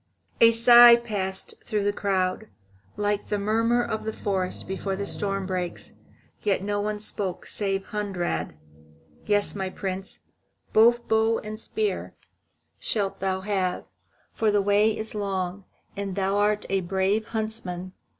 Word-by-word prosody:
A 230 0 +8
sigh 235 +1 +9
passed 200 -5 -4
through 210 -3 -1
the 205 0 +1
crowd, 195 +1 -1 0.5
like 205 0 -1
the 210 - 0
murmur 230 +4 +2
of 220 -2 -3
the 220 - -2
forest 190 -4 -2
before 190 0 -3
the 200 +1 -3
storm 195 -1 -1
breaks. 180 -2 -4 0.5
Yet 200 -2 0
no 205 0 -1
one 210 0 -2
spoke 200 -3 -4
save 195 -2 -2
Hunrad: 180 - -2 0.7
"Yes, 205 -1 +1
my 190 -2 -3
Prince, 190 0 -5 0.6
both 235 +2 +5
bow 220 +1 +3
and 215 0 -7
spear 425 - -3 0.6
shalt 200 -3 -1
thou 190 0 -1
have, 190 -2 -1 0.5
for 220 - +1
the 205 0 +3
way 205 +2 +3
is 220 0 -5
long, 195 -2 -3 0.3
and 200 -2 -4
thou 195 0 0
art 210 +1 +2
a 195 0 +1
brave 190 +4 0
huntsman. 215 -5 -4
205 Hz, 140 wpm, -26 LUFS, 190-220 Hz, 0.7 s, sigh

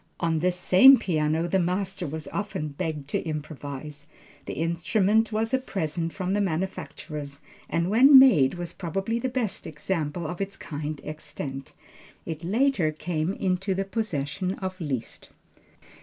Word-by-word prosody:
On 165 -2 +1
this 180 +2 +1
same 195 +9 +7
piano 160 -3 0
the 190 +2 +2
master 180 0 -1
was 155 0 -5
often 195 -7 -3
begged 150 -1 -4
to - - 0
improvise. 150 -1 -6 0.4
The - - -3
instrument 195 +7 +1
was 220 +3 -1
a 260 - +4
present 165 - -2
from 185 +1 -2
the 205 - +2
manufacturers, 155 -5 -4 0.3
and 170 +1 0
when 260 +8 +8
made, 180 - +6
was 175 -1 -6
probably 195 +6 -2
the 260 - -1
best 245 -5 -2
example 160 +1 -3
of 175 +4 -4
its 195 0 -3
kind 150 0 -5
extant. 150 -3 -7 0.5
It 160 0 -5
later 205 - +2
came 155 +2 -2
into 190 0 -1
the 195 +1 -1
possession 185 -4 -2
of 185 -1 -6
Liszt. 135 -7 -4
175 Hz, 145 wpm, -26 LUFS, 155-195 Hz, 0.5 s, when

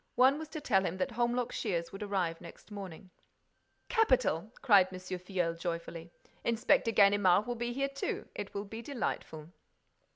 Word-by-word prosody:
One 265 +4 +5
was 315 - -6
to 310 +1 -6
tell 205 -10 +2
him 185 0 -2
that 185 - -1
Holmlock 240 +1 0
Shears 170 -6 -2
would 195 - -9
arrive 185 -5 -1
next 170 +5 -13
morning. 190 -3 -8 0.8
"Capital!" 255 - +2
cried 200 -8 +6
M. 185 - -6
Filleul, 180 -1 -2
joyfully. 170 0 -5 0.3
"Inspector 230 0 +2
Ganimard 200 -2 +5
will 245 - -2
be 240 0 -3
here 275 +3 0
too. 275 0 -4
It 205 - -6
will 200 +1 -3
be 220 +3 -7
delightful." 175 - -4
200 Hz, 160 wpm, -32 LUFS, 180-240 Hz, 0.8 s, cried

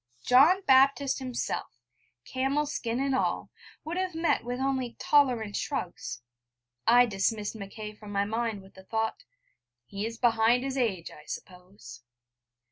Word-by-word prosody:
John 310 +10 +5
Baptist 275 +1 +4
himself, 255 -2 -4 0.5
camel 270 +3 0
skin 240 -5 -3
and 275 0 0
all, 260 - -1 0.3
would, 335 +3 -4
have 370 -2 -2
met 325 -6 +1
with 245 +1 -4
only 265 -2 -1
tolerant 245 -8 +2
shrugs. 180 - -4 0.6
I 245 +1 +7
dismissed 210 0 -1
Mackay 210 +1 -7
from 210 -1 -11
my 200 0 +1
mind 220 -1 -2
with 190 - -17
the 190 - -14
thought: 225 - -2 0.6
'He 205 - -4
is 230 0 -7
behind 235 +1 +3
his 270 0 -3
age, 210 -10 -1
I 150 - -14
suppose.' 120 - -10
235 Hz, 140 wpm, -28 LUFS, 205-270 Hz, 0.6 s, I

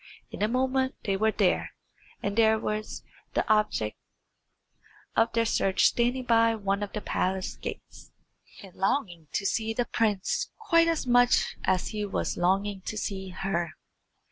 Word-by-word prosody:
In - - -7
a 210 - +3
moment 260 +2 0
they 195 -3 0
were 220 +3 +2
there, 200 -4 +1 0.5
and 200 0 -1
there 220 -1 +4
too - - -7
was 215 0 -3 0.3
the - - +1
object 210 - +1 1.2
of 225 +1 +3
their 230 0 +2
search 195 -3 +1
standing 245 +2 +2
by 230 -1 +4
one 200 -1 -1
of 205 - -4
the 210 - -3
palace 185 -1 -1
gates, - - -9 0.5
and 190 -2 -12
longing 190 - -1
to 195 - -1
see 225 +2 0
the 245 - +1
prince 210 -5 0
quite 335 -7 +3
as 330 -4 0
much 245 0 +3
as 185 -1 +1
he 210 -1 -3
was 200 - -2
longing 195 +2 0
to 215 - -4
see 190 -2 -4
her. 180 -3 -2
215 Hz, 160 wpm, -28 LUFS, 195-235 Hz, 1.2 s, there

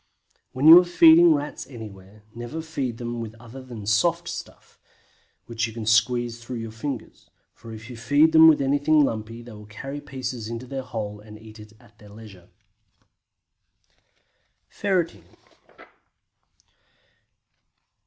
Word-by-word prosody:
When 135 +4 0
you 165 +2 +11
are - - +2
feeding 170 -1 +6
Rats 145 +1 -6
anywhere, 105 -4 -12
never 120 +8 -7
feed 135 -7 -4
them 120 0 -5
with 110 -1 -8
other 120 +3 -11
than 120 -5 -10
soft 170 +12 +1
stuff, - - -10 0.7
which 115 -1 -3
you 115 - -10
can 115 -1 -7
squeeze 115 +2 +1
through 125 +1 -7
your 115 -1 -6
fingers, 120 +2 -7 0.2
for 115 - -13
if 110 0 -10
you 125 - -9
feed 145 +7 +3
them 160 0 +8
with 150 -3 +4
anything 145 +2 +3
lumpy, 115 0 -5
they 120 - -12
will 105 -1 -12
carry 135 +7 -8
pieces 125 -5 -6
into 115 +2 -6
their 135 +1 -5
holes 105 -4 -6
and 105 0 -13
eat 110 0 -14 0.2
at 120 -3 -23
their 105 - -16
leisure. 100 -4 -14 2.2
FERRETING. 185 -4 -2
120 Hz, 140 wpm, -24 LUFS, 110-145 Hz, 2.2 s, you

